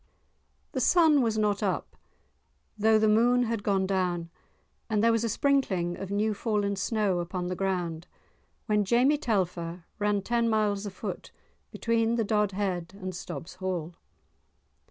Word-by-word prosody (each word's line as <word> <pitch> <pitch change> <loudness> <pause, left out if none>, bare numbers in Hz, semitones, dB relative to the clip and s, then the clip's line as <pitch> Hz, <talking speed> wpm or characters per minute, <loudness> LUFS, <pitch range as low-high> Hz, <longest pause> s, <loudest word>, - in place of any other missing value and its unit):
The - - -2
sun 320 -5 +5
was 225 -3 0
not 210 -2 +1
up - - -2 0.8
though 220 +1 +4
the 215 0 +3
moon 240 +3 +4
had 230 -2 -2
gone 195 -2 +1
down, 180 -3 -1 0.6
and 215 -1 +1
there 230 - +5
was 230 0 +1
a 230 - 0
sprinkling 200 -12 +1
of 195 - -7
new 210 +2 +1
fallen 205 -1 -1
snow 195 -1 0
upon 180 +1 -3
the 180 - -2
ground 180 -3 -2 0.6
when 210 -2 +2
Jamie 250 +8 +3
Telfer 180 - -2
ran 205 -1 +1
ten 235 +1 +1
miles 210 -2 0
a - - -3
foot 190 - -7 0.4
between 230 0 0
the 230 -2 0
Dodhead 195 -4 -1
and 185 -1 -5
Stob's 175 -1 -7
Hall. 180 -3 -3
205 Hz, 150 wpm, -28 LUFS, 185-225 Hz, 0.8 s, sun